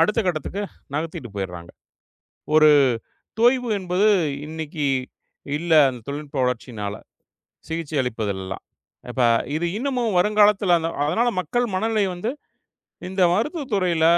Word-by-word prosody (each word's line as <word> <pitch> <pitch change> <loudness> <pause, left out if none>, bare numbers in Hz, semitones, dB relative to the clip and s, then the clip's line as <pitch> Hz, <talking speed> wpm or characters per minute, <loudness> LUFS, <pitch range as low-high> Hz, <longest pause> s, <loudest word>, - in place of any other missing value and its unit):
அடுத்த 210 +7 +3
கட்டத்துக்கு 180 +4 -2 0.3
நகர்த்திட்டு 155 -5 -4
போயிறாங்க. 90 -3 -5 0.9
ஒரு 155 0 +7 0.7
தொய்வு 245 +1 +3
என்பது 185 +2 +1 0.4
இன்னைக்கி 155 -1 -4 0.7
இல்ல. 170 +2 -4 0.2
அந்த 125 -2 -7
தொழில்நுட்ப 145 0 -5
வளர்ச்சியினால 115 -5 -3 0.7
சிகிச்சை 160 -2 -3
அளிப்பதுலெல்லாம். 100 -6 -4 0.5
இப்ப 130 - -2 0.3
இது 165 +2 0
இன்னமும் 245 -4 -1
வருங்காலத்துல 205 -1 +4 0.3
அதனால 220 +11 +1
மக்கள் 240 +9 0
மனநிலை 220 +1 +1
வந்து 180 +7 -3 0.8
இந்த 190 0 0
மருத்துவ 295 - -1
துறையில 180 -5 +2
170 Hz, 105 wpm, -23 LUFS, 140-210 Hz, 0.9 s, ஒரு